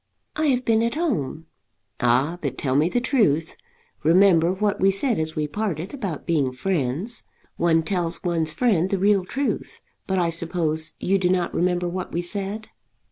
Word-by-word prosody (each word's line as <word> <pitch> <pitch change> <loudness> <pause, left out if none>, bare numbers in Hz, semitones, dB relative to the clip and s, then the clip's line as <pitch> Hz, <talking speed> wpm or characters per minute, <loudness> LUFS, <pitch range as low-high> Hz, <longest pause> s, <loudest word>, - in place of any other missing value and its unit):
"I 310 0 +1
have 255 -2 +1
been 225 -1 +3
at 230 +3 0
home." 165 - -2 0.5
"Ah; 130 +8 +2
but - - -3
tell 130 -2 -1
me 155 +4 +3
the 245 - +1
truth. 185 - +1 0.5
Remember 170 -1 +4
what 205 +2 -1
we 195 - +4
said 205 - +1
as 160 0 -3
we 155 - 0
parted, 185 - -3
about 195 - -5
being 145 -6 +1
friends. 175 - -2 0.4
One 165 -1 +2
tells 175 -2 -2
one's 165 -3 -1
friend 190 -5 +1
the 195 - 0
real 200 0 +3
truth. 270 +9 -3 0.3
But 190 - 0
I 170 -2 +1
suppose 160 -2 +1
you 195 +1 +1
do 180 -1 +1
not 180 -1 0
remember 180 0 0
what 180 +1 -4
we 175 - -1
said?" 200 +4 -3
180 Hz, 175 wpm, -23 LUFS, 160-205 Hz, 0.5 s, Remember